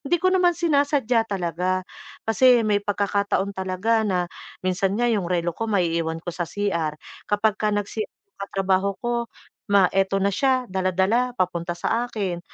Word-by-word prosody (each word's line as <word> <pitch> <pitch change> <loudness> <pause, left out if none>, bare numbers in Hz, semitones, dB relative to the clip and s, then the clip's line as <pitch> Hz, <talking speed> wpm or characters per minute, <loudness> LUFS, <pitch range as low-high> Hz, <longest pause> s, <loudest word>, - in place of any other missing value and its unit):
Hindi 300 +4 +1
ko 370 +2 +1
naman 355 -2 +3
sinasadya 280 -8 +2
talaga, 180 0 -1 0.4
kasi 240 +1 +5
may 205 -1 +2
pagkakataon 200 -1 0
talaga 190 +4 0
na 185 -5 0 0.4
minsan 190 +2 0
nga 240 - +1
'yong 210 -7 +1
relo 175 -1 0
ko 225 +6 -4
maiiwan 165 -5 0
ko 175 - -4
sa 175 -1 -4
CR, 170 -7 -1 0.3
kapagka 210 0 +1
nag-CR 205 +1 -3
'yong 405 -1 -55
katrabaho 195 0 0
ko, 240 0 0 0.5
ma 200 -2 +5
ito 195 0 +2
na 195 0 +1
siya, 260 +3 +2
dala-dala, 190 +7 +1
papunta 175 -1 -1
sa 235 +7 -1
akin. 190 -7 -3
200 Hz, 155 wpm, -24 LUFS, 185-230 Hz, 0.5 s, kasi